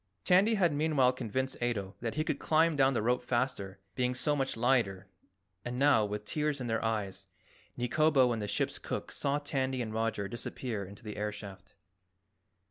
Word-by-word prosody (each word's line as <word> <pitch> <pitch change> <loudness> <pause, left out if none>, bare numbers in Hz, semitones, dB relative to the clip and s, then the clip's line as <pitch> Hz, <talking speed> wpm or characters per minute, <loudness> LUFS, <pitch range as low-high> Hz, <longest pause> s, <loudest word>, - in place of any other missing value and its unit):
Tandy 195 +5 +5
had 175 -6 +3
meanwhile 145 -4 +3
convinced 130 +2 -3
Ato 105 -5 -1
that 115 -1 -3
he 155 - +1
could - - -2
climb 160 0 +3
down 135 -1 +3
the 110 - 0
rope 125 +2 +2
faster, 120 -6 -1 0.2
being 125 -1 0
so 145 +3 +1
much 135 -4 -1
lighter, 115 -6 +2 0.6
and 120 0 -4
now, 135 -5 +4
with 105 0 -4
tears 150 +4 -1
in 125 - -4
their 115 -1 -1
eyes, 105 -4 -2 0.5
Nikobo 130 +1 +3
and 115 -2 -1
the 105 - -3
ship's - - -1
cook - - -4
saw 140 0 0
Tandy 135 -3 -1
and 110 -3 -3
Roger 110 -3 -1
disappear 120 -2 -4
into 100 +5 -11
the 105 -2 -6
air 105 0 -1
shaft. 100 -1 -10
125 Hz, 180 wpm, -31 LUFS, 105-140 Hz, 0.6 s, Tandy